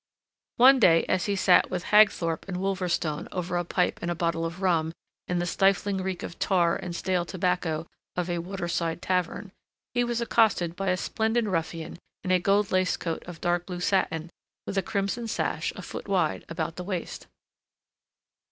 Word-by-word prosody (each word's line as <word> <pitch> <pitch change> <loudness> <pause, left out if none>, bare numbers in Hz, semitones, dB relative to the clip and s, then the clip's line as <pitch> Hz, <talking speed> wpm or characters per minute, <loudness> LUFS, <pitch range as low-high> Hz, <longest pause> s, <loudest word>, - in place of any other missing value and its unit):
One 260 +2 +7
day 165 -7 +6
as 185 - +1
he 200 - +1
sat 185 -1 +4
with 180 -1 -3
Hagthorpe 200 -6 +4
and 185 -2 -3
Wolverstone 180 -5 -1
over 180 0 -3
a 175 - +1
pipe 180 +1 0
and 170 - -2
a 175 - -1
bottle 165 0 0
of 170 +2 -8
rum 165 -3 +2 0.3
in 180 - -1
the 175 - 0
stifling 195 +2 +2
reek 185 -2 -3
of 170 - -7
tar 175 -3 +2
and 175 -2 -5
stale 180 0 0
tobacco 180 -3 -1 0.3
of 180 -1 -1
a 175 -1 -1
waterside 175 -2 -3
tavern, 185 +2 -1 0.4
he 245 0 +2
was 240 -1 -1
accosted 220 -7 +2
by 195 +1 -3
a 185 - +2
splendid 225 +4 0
ruffian 165 -3 -3 0.2
in 185 - -1
a 185 - +5
gold 200 +2 +2
laced 185 0 +1
coat 165 -2 -3
of 175 -2 -9
dark 175 0 0
blue 180 -2 -5
satin 170 -3 0 0.3
with - - -4
a 195 - +2
crimson 200 +4 -2
sash, 225 - -1
a - - -8
foot - - -7
wide, 180 -6 0
about 165 0 -3
the 180 - -4
waist. 180 -2 -5
180 Hz, 180 wpm, -27 LUFS, 170-195 Hz, 0.4 s, One